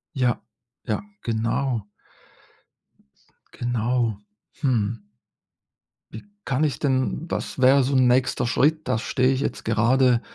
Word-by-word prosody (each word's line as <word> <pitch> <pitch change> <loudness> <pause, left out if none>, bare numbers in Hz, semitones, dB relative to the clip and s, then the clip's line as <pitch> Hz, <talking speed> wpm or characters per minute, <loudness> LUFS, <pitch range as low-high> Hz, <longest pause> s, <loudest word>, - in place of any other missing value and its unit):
Ja, 125 -3 0 0.5
ja, 105 - 0 0.2
genau. 115 0 -1 1.6
Genau. 120 -2 -1 0.4
Hm. 115 -5 0 1.1
Wie 110 - -9 0.2
kann 135 +3 0
ich 145 -5 -1
denn 135 +3 0
was - - -4
wäre 130 +1 +5
so 135 - -1
'n 130 -1 +4
nächster 125 -1 +2
Schritt? 155 +6 +1
Das 110 - +1
stehe 130 +1 +1
ich 130 - -1
jetzt - - -3
gerade 120 +3 +3
125 Hz, 115 wpm, -24 LUFS, 115-135 Hz, 1.6 s, wäre